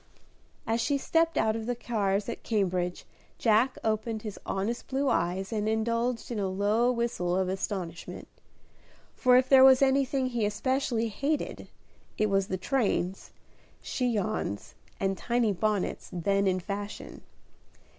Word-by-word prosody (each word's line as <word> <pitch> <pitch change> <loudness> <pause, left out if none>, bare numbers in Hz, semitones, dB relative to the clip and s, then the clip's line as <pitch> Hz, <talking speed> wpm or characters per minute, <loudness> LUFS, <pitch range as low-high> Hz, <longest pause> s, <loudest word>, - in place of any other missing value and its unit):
As 225 +1 0
she 285 +4 +1
stepped 330 +3 +1
out 220 0 +2
of 225 0 -4
the 245 - 0
cars 205 -4 -1
at 235 - -5
Cambridge, 180 -5 -1 0.3
Jack 230 +3 +3
opened 220 0 -1
his 210 -3 -6
honest 205 +5 -2
blue 275 +1 0
eyes 185 +4 0
and 215 0 0
indulged 230 +2 -1
in 225 - -2
a 195 - 0
low 205 +6 +2
whistle 235 -7 -1
of 190 -1 +1
astonishment: 185 -3 -4 0.9
for 250 -1 +4
if 255 0 +3
there 265 -1 +7
was 265 0 +7
anything 270 0 +2
he 240 -3 -1
especially 230 +2 0
hated, 285 +8 -2 0.5
it 215 -1 +1
was 195 0 +2
the 185 - -2
trains, 195 -3 -1 0.5
chignons 215 - -2 0.3
and 195 0 -1
tiny 235 -3 +1
bonnets 210 +1 -1
then 195 +3 +1
in 185 -1 +1
fashion. 200 +3 -6
220 Hz, 140 wpm, -28 LUFS, 195-245 Hz, 0.9 s, there